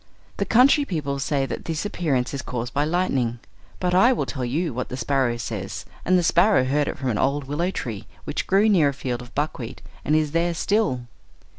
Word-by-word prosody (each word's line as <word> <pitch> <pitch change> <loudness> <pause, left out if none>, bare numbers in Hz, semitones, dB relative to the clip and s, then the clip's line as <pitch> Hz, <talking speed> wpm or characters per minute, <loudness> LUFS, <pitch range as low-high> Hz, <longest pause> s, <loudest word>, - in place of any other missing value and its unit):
The - - 0
country 265 +5 +5
people 145 - -3
say 135 0 0
that 130 - -6
this 165 +3 -2
appearance 145 -11 -1
is 140 - -3
caused 120 -2 -4
by 145 +1 +1
lightning; 140 -8 0 0.4
but 180 -1 0
I 195 +8 +6
will - - -1
tell 130 -4 -4
you 150 +6 -1
what 125 +2 -4
the 125 - -5
sparrow 130 -2 +1
says, 120 - -5 0.2
and 185 +1 +3
the 175 - +2
sparrow 175 -1 +4
heard 145 +3 +1
it - - -3
from 130 -1 -2
an 105 - -1
old 140 +2 +1
willow 145 +6 -1
tree 115 - -5 0.2
which - - -3
grew 200 +3 +4
near 175 -9 +4
a - - -3
field 125 -3 -3
of 120 0 -13
buckwheat, 135 -5 -3 0.2
and 150 - +2
is 155 -2 +1
there 170 +1 +1
still. 200 - +1
145 Hz, 210 wpm, -24 LUFS, 130-175 Hz, 0.4 s, I